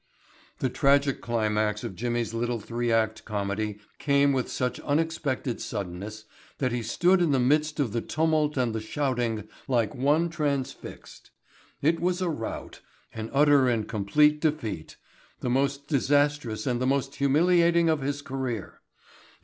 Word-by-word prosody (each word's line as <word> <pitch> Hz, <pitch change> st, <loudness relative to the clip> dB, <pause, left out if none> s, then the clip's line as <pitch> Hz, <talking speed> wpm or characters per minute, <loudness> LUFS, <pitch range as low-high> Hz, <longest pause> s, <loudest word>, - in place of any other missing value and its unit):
The 130 Hz, -, 0 dB
tragic 140 Hz, +1 st, +2 dB
climax 110 Hz, -2 st, 0 dB
of -, -, -4 dB
Jimmy's 120 Hz, +1 st, -2 dB
little 120 Hz, 0 st, -1 dB
three 120 Hz, +2 st, -2 dB
act 110 Hz, -1 st, +1 dB
comedy 105 Hz, 0 st, -3 dB, 0.2 s
came 140 Hz, -1 st, +3 dB
with 130 Hz, -2 st, -1 dB
such 125 Hz, -1 st, -2 dB
unexpected 145 Hz, -5 st, -1 dB
suddenness 105 Hz, +2 st, -5 dB, 0.3 s
that 130 Hz, -3 st, 0 dB
he 120 Hz, 0 st, -1 dB
stood 180 Hz, -, +2 dB
in 170 Hz, -, +3 dB
the 135 Hz, -2 st, +3 dB
midst 150 Hz, +4 st, +2 dB
of 135 Hz, -7 st, +1 dB
the 115 Hz, -, 0 dB
tumult 155 Hz, 0 st, 0 dB
and 125 Hz, -3 st, +1 dB
the 110 Hz, -, -2 dB
shouting 120 Hz, -3 st, -2 dB, 0.2 s
like 120 Hz, -5 st, +1 dB
one 145 Hz, +6 st, +2 dB
transfixed. 145 Hz, -5 st, -4 dB, 0.5 s
It 165 Hz, +3 st, +3 dB
was 180 Hz, +1 st, 0 dB
a 185 Hz, -2 st, 0 dB
rout, 115 Hz, -7 st, -6 dB, 0.3 s
an 110 Hz, 0 st, -5 dB
utter 140 Hz, -2 st, +5 dB
and 110 Hz, -3 st, 0 dB
complete 150 Hz, +9 st, +2 dB
defeat, 115 Hz, -, -2 dB, 0.5 s
the 125 Hz, -, -1 dB
most 140 Hz, +2 st, 0 dB
disastrous 145 Hz, -5 st, +1 dB
and 125 Hz, -2 st, 0 dB
the 130 Hz, -, +1 dB
most 135 Hz, 0 st, 0 dB
humiliating 170 Hz, +4 st, +4 dB
of 155 Hz, -3 st, +2 dB
his 145 Hz, +1 st, -3 dB
career. 130 Hz, -6 st, -4 dB
130 Hz, 150 wpm, -27 LUFS, 115-145 Hz, 0.5 s, utter